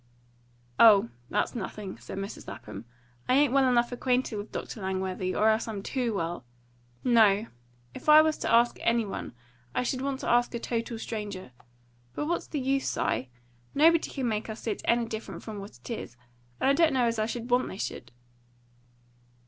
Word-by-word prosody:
"Oh, 205 Hz, -, +7 dB, 0.2 s
that's -, -, 0 dB
nothing," 205 Hz, -3 st, -6 dB
said -, -, -8 dB
Mrs. 195 Hz, +1 st, -6 dB
Lapham. 105 Hz, +1 st, -8 dB, 0.4 s
"I 255 Hz, -, +5 dB
ain't 280 Hz, -2 st, +4 dB
well 270 Hz, -1 st, +4 dB
enough 240 Hz, -1 st, +2 dB
acquainted 250 Hz, -1 st, 0 dB
with 205 Hz, +1 st, -6 dB
Dr. 220 Hz, -, -6 dB
Langworthy, 190 Hz, -1 st, -2 dB
or 215 Hz, -, +3 dB
else 220 Hz, +1 st, +1 dB
I'm 205 Hz, -3 st, -5 dB
TOO 245 Hz, -3 st, -1 dB
well. 170 Hz, -4 st, -3 dB, 0.6 s
No; 220 Hz, -4 st, +5 dB, 0.5 s
if -, -, -5 dB
I 305 Hz, 0 st, +10 dB
was 315 Hz, -1 st, +1 dB
to -, -, -1 dB
ask 235 Hz, +1 st, +4 dB
any 230 Hz, -1 st, +2 dB
one, 195 Hz, -, -6 dB, 0.4 s
I -, -, +1 dB
should 255 Hz, +1 st, -2 dB
want 275 Hz, 0 st, -2 dB
to -, -, -4 dB
ask 240 Hz, 0 st, +2 dB
a -, -, -2 dB
total 230 Hz, 0 st, -3 dB
stranger. 205 Hz, -, -6 dB, 0.6 s
But -, -, -2 dB
what's 340 Hz, +2 st, -2 dB
the 295 Hz, -, -3 dB
use, 270 Hz, +1 st, 0 dB
Si? 125 Hz, -, -1 dB, 0.5 s
Nobody 325 Hz, +3 st, +5 dB
could 265 Hz, -3 st, -3 dB
make 220 Hz, -1 st, -2 dB
us 220 Hz, -, -6 dB
see 225 Hz, -, -2 dB
it -, -, -5 dB
any 235 Hz, 0 st, +2 dB
different 225 Hz, -1 st, -7 dB
from 215 Hz, -2 st, -6 dB
what 200 Hz, +2 st, -10 dB
it -, -, -13 dB
is, 125 Hz, -, -6 dB, 0.4 s
and -, -, +1 dB
I 275 Hz, -, +5 dB
don't 315 Hz, 0 st, +4 dB
know 255 Hz, -2 st, +3 dB
as 230 Hz, -1 st, 0 dB
I 215 Hz, -, +1 dB
should 240 Hz, +1 st, -5 dB
want 250 Hz, +1 st, +3 dB
they 190 Hz, -, -7 dB
should." 120 Hz, -, -5 dB
230 Hz, 190 wpm, -28 LUFS, 205-255 Hz, 0.6 s, I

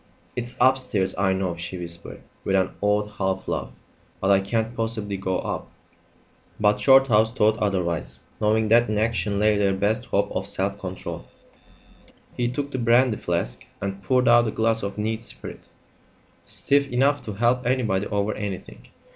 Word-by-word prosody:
"It's 120 Hz, 0 st, -4 dB
upstairs, 125 Hz, -7 st, +2 dB
I 95 Hz, 0 st, +2 dB
know," 95 Hz, -2 st, -1 dB
she 90 Hz, +2 st, -6 dB
whispered, 85 Hz, -1 st, -8 dB, 0.2 s
with 95 Hz, -, 0 dB
an 95 Hz, -1 st, +2 dB
odd 105 Hz, 0 st, +2 dB
half 95 Hz, -1 st, -1 dB
laugh; -, -, -2 dB, 0.5 s
"but 95 Hz, -, +2 dB
I 100 Hz, -, +6 dB
can't 110 Hz, +4 st, -2 dB
possibly 115 Hz, -3 st, -3 dB
go 95 Hz, -1 st, -1 dB
up." -, -, -4 dB, 0.9 s
But 105 Hz, 0 st, +3 dB
Shorthouse 115 Hz, -3 st, +5 dB
thought 110 Hz, -2 st, +2 dB
otherwise, 85 Hz, -11 st, -1 dB, 0.2 s
knowing 110 Hz, 0 st, +2 dB
that 120 Hz, +1 st, +5 dB
in 110 Hz, -, 0 dB
action 110 Hz, -2 st, 0 dB
lay 105 Hz, 0 st, +3 dB
their 100 Hz, -1 st, +2 dB
best 110 Hz, +5 st, 0 dB
hope 100 Hz, -3 st, 0 dB
of 95 Hz, -, -2 dB
self 100 Hz, 0 st, -1 dB
control. 95 Hz, -1 st, -6 dB, 1.1 s
He 120 Hz, -, 0 dB
took 140 Hz, +3 st, -3 dB
the 130 Hz, -, -3 dB
brandy 120 Hz, 0 st, +3 dB
flask 85 Hz, -8 st, -2 dB, 0.2 s
and 100 Hz, 0 st, -4 dB
poured 125 Hz, +6 st, +2 dB
out 120 Hz, 0 st, +6 dB
a -, -, -1 dB
glass 115 Hz, +1 st, +1 dB
of 100 Hz, 0 st, -4 dB
neat 110 Hz, +1 st, -2 dB
spirit, 115 Hz, -, -6 dB, 0.8 s
stiff 140 Hz, -1 st, +1 dB
enough 140 Hz, +4 st, +2 dB
to 105 Hz, -, -5 dB
help 120 Hz, +4 st, +1 dB
anybody 110 Hz, -6 st, +1 dB
over 100 Hz, +1 st, -1 dB
anything. 100 Hz, -3 st, -7 dB
105 Hz, 165 wpm, -24 LUFS, 95-120 Hz, 1.1 s, I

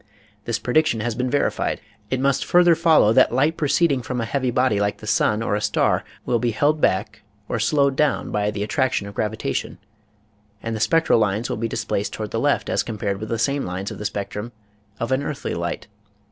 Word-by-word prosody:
This 115 Hz, -1 st, -1 dB
prediction 125 Hz, -2 st, +1 dB
has 120 Hz, +1 st, -1 dB
been 125 Hz, +2 st, -2 dB
verified. 145 Hz, -, 0 dB, 0.3 s
It 130 Hz, -, -1 dB
must 135 Hz, 0 st, +1 dB
further 175 Hz, -1 st, +5 dB
follow 160 Hz, -9 st, +4 dB
that -, -, +5 dB
light 145 Hz, +6 st, +2 dB
proceeding 145 Hz, -2 st, +2 dB
from 125 Hz, +2 st, -4 dB
a 115 Hz, -, -1 dB
heavy 130 Hz, +1 st, -1 dB
body 125 Hz, -3 st, +2 dB
like 100 Hz, 0 st, 0 dB
the -, -, -11 dB
sun 110 Hz, 0 st, +1 dB
or 110 Hz, -, -1 dB
a 105 Hz, -, 0 dB
star -, -, +1 dB, 0.2 s
will 120 Hz, -, +1 dB
be 120 Hz, -, 0 dB
held 145 Hz, +6 st, +1 dB
back 105 Hz, +3 st, 0 dB, 0.3 s
or 120 Hz, -, -2 dB
slowed 140 Hz, +4 st, +2 dB
up 150 Hz, -, 0 dB
by 105 Hz, 0 st, 0 dB
the 105 Hz, -1 st, -3 dB
attraction 130 Hz, -1 st, 0 dB
of 100 Hz, -, -8 dB
gravitation, 105 Hz, -9 st, -3 dB, 0.9 s
and 115 Hz, -1 st, -3 dB
the -, -, -4 dB
spectral 165 Hz, +2 st, +3 dB
lines 105 Hz, +2 st, 0 dB
will -, -, -2 dB
be 115 Hz, +1 st, -1 dB
displaced 105 Hz, -2 st, -2 dB
toward 110 Hz, -1 st, -5 dB
the 115 Hz, -, -1 dB
left 145 Hz, +3 st, +1 dB
as -, -, +1 dB
compared 100 Hz, -3 st, -3 dB
with 110 Hz, +1 st, -6 dB
the 115 Hz, -, -1 dB
same 140 Hz, +5 st, 0 dB
lines 90 Hz, +2 st, -4 dB
in -, -, -8 dB
the 105 Hz, -, -6 dB
spectrum 105 Hz, +3 st, -4 dB, 0.5 s
of 115 Hz, +2 st, -3 dB
an 130 Hz, +1 st, +2 dB
earthly 140 Hz, 0 st, -4 dB
light. 85 Hz, 0 st, -3 dB
115 Hz, 210 wpm, -22 LUFS, 105-140 Hz, 0.9 s, further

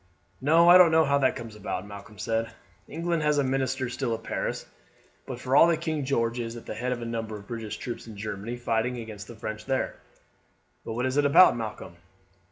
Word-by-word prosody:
"No, 165 Hz, +5 st, +5 dB
I 180 Hz, +1 st, +9 dB
don't 180 Hz, -2 st, +8 dB
know 160 Hz, 0 st, +4 dB
how 140 Hz, 0 st, +2 dB
that 130 Hz, -2 st, +2 dB
comes 115 Hz, -2 st, -8 dB
about," 95 Hz, -2 st, -4 dB
Malcolm 100 Hz, +1 st, -11 dB
said. 115 Hz, +3 st, -1 dB, 0.4 s
"England 170 Hz, +1 st, -2 dB
has 150 Hz, -1 st, +2 dB
a 145 Hz, -, +3 dB
minister 130 Hz, -1 st, -1 dB
still 120 Hz, -1 st, -2 dB
at -, -, -11 dB
Paris; -, -, -3 dB, 0.6 s
but 125 Hz, -2 st, -6 dB
for 130 Hz, +1 st, 0 dB
all 165 Hz, -, +8 dB
that 165 Hz, -2 st, +1 dB
King 155 Hz, -4 st, -2 dB
George 120 Hz, -3 st, 0 dB
is 115 Hz, 0 st, -4 dB
at 120 Hz, -, -10 dB
the -, -, -5 dB
head 125 Hz, +4 st, -3 dB
of 120 Hz, -1 st, -3 dB
a -, -, -4 dB
number 115 Hz, -2 st, -4 dB
of 100 Hz, -1 st, -10 dB
British 115 Hz, -1 st, -5 dB
troops 120 Hz, -1 st, -6 dB
in 110 Hz, -2 st, -10 dB
Germany 105 Hz, +3 st, -5 dB
fighting 120 Hz, +1 st, -1 dB
against 110 Hz, -3 st, -8 dB
the 120 Hz, -, -10 dB
French 110 Hz, 0 st, -6 dB
there." 135 Hz, -1 st, -1 dB, 0.9 s
"But 115 Hz, -, -5 dB
what 125 Hz, +3 st, -1 dB
is 130 Hz, +2 st, -1 dB
it 145 Hz, -, +3 dB
about, 160 Hz, +1 st, +7 dB
Malcolm?" 110 Hz, -6 st, -6 dB
120 Hz, 220 wpm, -27 LUFS, 110-140 Hz, 0.9 s, I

